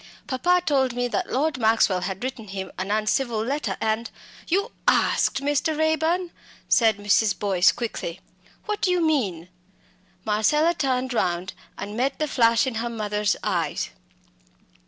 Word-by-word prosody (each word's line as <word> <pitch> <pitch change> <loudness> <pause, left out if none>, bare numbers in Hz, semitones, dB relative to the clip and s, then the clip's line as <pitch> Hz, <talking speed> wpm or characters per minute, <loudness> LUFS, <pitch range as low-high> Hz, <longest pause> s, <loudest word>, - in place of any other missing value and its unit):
Papa 350 +7 +1
told 265 -4 +2
me 245 0 0
that 365 +8 -2
Lord 285 +1 0
Maxwell 220 -5 +3
had 190 +3 -4
written 250 -4 -5
him 190 -1 -6
an 190 +1 -3
uncivil 215 +3 0
letter 285 +4 -2
and 220 +2 -1 0.2
" - - -20
"You 400 +7 0 0.2
asked 275 - +2
Mr. 290 +2 0
Raeburn 320 +3 +1 0.2
" - - -24
said 225 -4 +4
Mrs. 205 +1 +2
Boyce, 195 -3 +3
quickly. 190 -7 -5 0.5
"What 425 -1 -3
do - - +2
you 360 0 +2
mean?" 200 - 0 0.8
Marcella 300 +11 +2
turned 260 -4 -1
round 180 -4 -1 0.2
and 205 +2 -6
met 260 +4 0
the 305 - -1
flash 230 -3 +3
of 255 -4 -3
her 235 +1 -2
mother's 210 -2 -1
eyes. - - -1
240 Hz, 155 wpm, -24 LUFS, 210-295 Hz, 0.8 s, said